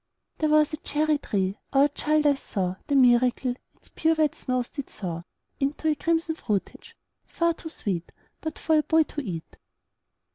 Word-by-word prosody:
There 310 - +2
was 305 0 +4
a - - -2
cherry 300 0 0
tree 195 -3 -1
our 275 +1 +6
child 300 +1 +1
eyes 285 -2 +4
saw 185 -2 -2
The 285 - +1
miracle: 250 0 +4 0.2
Its - - -17
pure 320 0 +2
white 310 -2 +2
snows 255 -1 -2
did 280 -3 -6
thaw 170 -3 -6 0.3
Into 290 +3 0
a - - +4
crimson 325 +2 0
fruitage, 210 -10 -4 0.3
far 335 0 +1
too 320 - -9
sweet 190 - -3 0.3
But 315 - -4
for 315 -1 +3
a - - +4
boy 320 +1 +4
to 295 - -5
eat. 175 - -6
285 Hz, 175 wpm, -26 LUFS, 235-310 Hz, 0.3 s, our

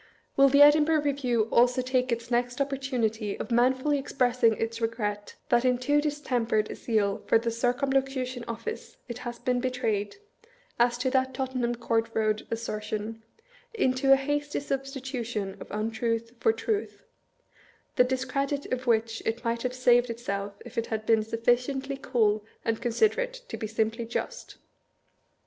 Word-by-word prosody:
Will 275 0 +6
the 285 +2 +7
Edinburgh 300 +1 +5
Review 260 -5 +1
also 245 +2 +4
take 255 0 0
its 235 +1 -3
next 245 +1 0
opportunity 250 -6 -1
of - - -5
manfully 260 +4 +3
expressing 250 -4 +2
its 230 +1 -3
regret 210 -3 -2
that 240 0 +4
in 250 -1 +3
too 290 +4 +2
distempered 245 -8 0
a - - -5
zeal 205 -4 0
for - - +5
the 230 +1 -1
Circumlocution 255 +1 0
Office 435 - -6
it 240 -1 -6
has 240 -1 -6
been 250 0 0
betrayed, 235 -5 -1 0.6
as 240 0 +3
to 255 +1 -1
that 260 -1 +1
Tottenham 255 -2 -1
Court 230 -1 0
Eoad 215 -1 0
assertion, 220 -1 -4 0.5
into 265 - +2
a - - +10
hasty 290 +2 -1
sub 270 -1 -2
stitution 245 -7 -5
of - - -9
untruth 230 +2 -2
for 450 - +4
truth; 435 -1 -3 0.9
the 250 - +6
discredit 265 +2 -2
of 255 0 -3
which 225 -1 +1
it 230 +2 -2
might 230 -1 -1
have 250 0 -2
saved 245 -1 +4
itself 200 -3 -4
if 250 - -4
it 230 - -3
had 220 -1 -3
been 225 -1 +4
sufficiently 245 +5 0
cool 220 -6 +1 0.2
and 225 -1 -1
considerate - - 0
to - - -4
be 215 - -4
simply 225 +2 -1
just? - - -5
245 Hz, 155 wpm, -28 LUFS, 225-270 Hz, 0.9 s, a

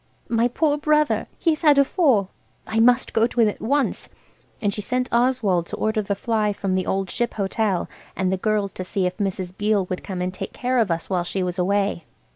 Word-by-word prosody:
My 230 0 +2
poor 295 +4 +1
brother! 300 0 +2
He's 320 -3 +1
had 300 -4 +5
a 280 - +6
fall. 260 - +2 0.3
I 220 +1 -1
must 245 +2 +4
go 225 +1 +3
to 245 - -5
him 225 - +6
at 210 - -3
once." 280 +4 0 0.5
And 205 -3 0
she 210 - -4
sent 250 +4 -1
Oswald 235 -8 +2
to - - -5
order 220 0 0
the 200 -1 -2
fly 210 0 0
from 195 -1 -2
the 185 -1 0
Old 195 -1 -1
Ship 240 0 -2
Hotel, 200 -1 0 0.3
and 190 0 0
the 190 - 0
girls 210 0 0
to 185 - -5
see 185 +1 -1
if 180 0 -2
Mrs. 185 -2 -3
Beale 205 -1 +1
would 185 - -3
come 190 -3 -5
and 180 0 -2
take 185 - -6
care 250 0 0
of 220 -4 +2
us 165 -1 -2
while 180 -2 0
she 185 +2 -2
was 180 0 -3
away. 195 -2 0
210 Hz, 225 wpm, -23 LUFS, 190-245 Hz, 0.5 s, a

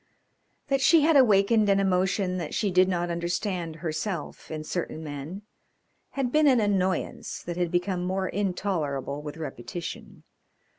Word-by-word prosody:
That 275 -1 +2
she 325 +4 +6
had 315 +1 +4
awakened 215 -4 +5
an 195 0 +4
emotion 185 0 +1
that 170 -4 -4
she 205 -3 0
did 185 +1 +4
not 175 -1 -1
understand 170 0 -2
herself 160 +1 -4
in 155 -1 -5
certain 160 -1 -4
men 150 +6 -6 0.7
had 260 -3 0
been 305 +1 +4
an 260 -3 +5
annoyance 190 -3 -1
that 175 - -4
had 175 -1 0
become 180 +1 -1
more 190 +1 -1
intolerable 170 -8 -2
with 150 +1 -7
repetition. 160 +2 -7
185 Hz, 145 wpm, -27 LUFS, 165-205 Hz, 0.7 s, she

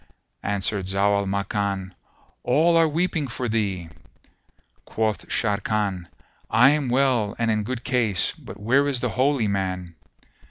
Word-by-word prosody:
Answered 100 -1 -1
Zau 100 +1 +2
al 100 - -2
Makan, 100 -1 -2 0.5
"All 160 +7 +3
are 165 -1 +5
weeping 160 -1 -1
for 125 +1 -4
thee." 100 -7 -2 0.9
Quoth 110 -4 -2
Sharrkan, 100 -4 -1 0.4
"I 125 +5 +6
am 145 -4 0
well 125 -5 +2
and 115 -1 +1
in 105 -1 +1
good 120 +2 -4
case; 115 -8 +1
but - - -12
where 130 +7 +2
is 135 -3 0
the 125 - 0
Holy 130 -2 +1
Man?" 95 -3 -2
110 Hz, 135 wpm, -24 LUFS, 100-130 Hz, 0.9 s, I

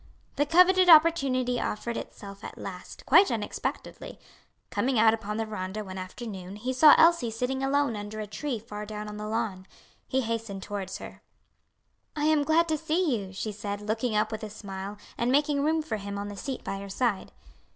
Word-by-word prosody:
The 290 - +1
coveted 365 +3 +5
opportunity 275 -7 +5
offered 235 +2 -3
itself 200 -1 -8
at - - -8
last, 180 -2 -9
quite 360 +8 +6
unexpectedly. 220 -3 -4 0.5
Coming 260 0 0
out 220 0 +6
upon 210 -1 -4
the 225 - -1
veranda 210 0 -5
one 190 -1 -7
afternoon, 190 0 -7
he 245 +5 -3
saw 295 +3 +8
Elsie 330 -8 +5
sitting 250 +4 -2
alone 275 -3 +1
under 205 +1 -6
a 215 - -3
tree 255 +5 -4
far 210 -1 -7
down 210 0 -6
on 210 0 -7
the 210 0 -5
lawn. 215 -4 -3 0.4
He 265 - +1
hastened 225 -4 -4
towards 200 -2 -5
her. - - -10 0.9
"I 295 -1 -1
am 310 -1 +3
glad 320 +3 +3
to 310 -1 0
see 320 -2 +1
you," 195 -4 -5
she 205 +3 -4
said, 205 0 -5
looking 220 +2 -2
up 210 - +1
with 220 - -4
a 215 - -5
smile 200 -1 -7 0.2
and 240 +1 +1
making 285 0 +2
room 315 +1 +1
for 300 -8 -3
him 200 0 -6
on 205 0 -4
the 205 - -7
seat 265 +6 -5
by 195 - -4
her 200 0 -8
side. 210 -1 -1
225 Hz, 195 wpm, -28 LUFS, 205-280 Hz, 0.9 s, saw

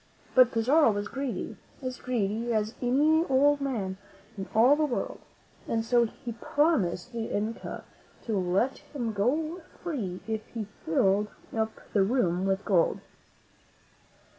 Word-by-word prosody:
But 255 -2 +6
Pizarro 255 +4 +4
was 205 0 -2
greedy, 270 0 -4 0.3
as 255 -1 -4
greedy 230 -1 -1
as 215 0 0
any 295 +6 +4
old 285 +1 +3
man 205 -9 -2 0.4
in 195 -2 -6
all 245 +6 +7
the 305 - +1
world, 300 - -3 0.5
and 225 -1 0
so 240 0 +4
he 235 +2 -8
promised 230 - 0
the 230 -1 -2
Inca 215 +3 -3 0.4
to 225 - -2
let 190 +7 +1
him 240 -6 -4
go 310 - 0 0.2
free 220 - -3
if 220 -1 -2
he 220 -2 -2 0.2
filled 195 +5 +3 0.3
up 220 0 0 0.2
the 205 - +4
room 190 -4 +1
with 195 +1 0
gold. 180 -5 +3
230 Hz, 140 wpm, -28 LUFS, 205-265 Hz, 0.5 s, all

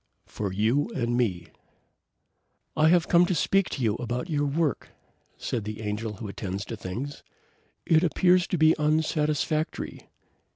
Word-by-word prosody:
FOR 100 -3 -4
YOU 115 - +1
AND 120 -1 0
ME 95 -9 0 1.3
"I 155 0 +4
have 175 0 +4
come 175 0 +5
to 185 - 0
speak 195 +4 +2
to 130 - -4
you 110 -2 +2
about 125 +7 -4
your 145 -1 +1
work," 150 +1 -1 0.5
said 115 -4 -3
the 105 +1 -6
Angel 105 +1 -3
who 105 +2 -7
attends 100 0 -5
to 115 - -5
things. 115 +9 -6 0.6
"It 160 0 +4
appears 180 +1 +3
to 180 - -1
be 155 0 +5
unsatisfactory." 155 0 -1
140 Hz, 150 wpm, -26 LUFS, 110-160 Hz, 1.3 s, come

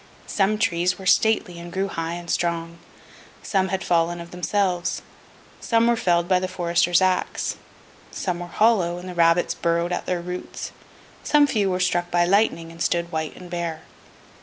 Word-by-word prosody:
Some 205 +1 +1
trees 180 -4 +1
were 190 - -10
stately, 185 -2 +2
and 170 0 -9
grew 190 +2 -1
high 165 -3 -4
and 175 0 -7
strong; 170 -1 -2 0.6
some 190 -2 +1
had 190 0 -2
fallen 170 0 +1
of 170 0 -9
themselves; 180 0 -1 0.6
some 230 -1 +2
were 235 0 +4
felled 175 -5 +1
by 185 -1 +3
the 185 - -2
forester's 175 0 +2
axe; 185 -1 0 0.5
some 180 -2 -3
were 175 - -6
hollow, 185 -3 +2
and 180 +1 -8
the 180 - -6
rabbits 170 0 +3
burrowed 170 +1 0
at - - -4
their 180 -1 0
roots; 180 +1 -6 0.5
some 295 -1 +5
few 210 -8 +1
were 180 0 -1
struck 175 -1 +1
by 175 0 +3
lightning, 180 -4 +1
and 165 0 -12
stood 170 0 0
white 160 -1 -3
and 180 -1 -12
bare. 170 -2 -3
175 Hz, 175 wpm, -23 LUFS, 170-190 Hz, 0.6 s, some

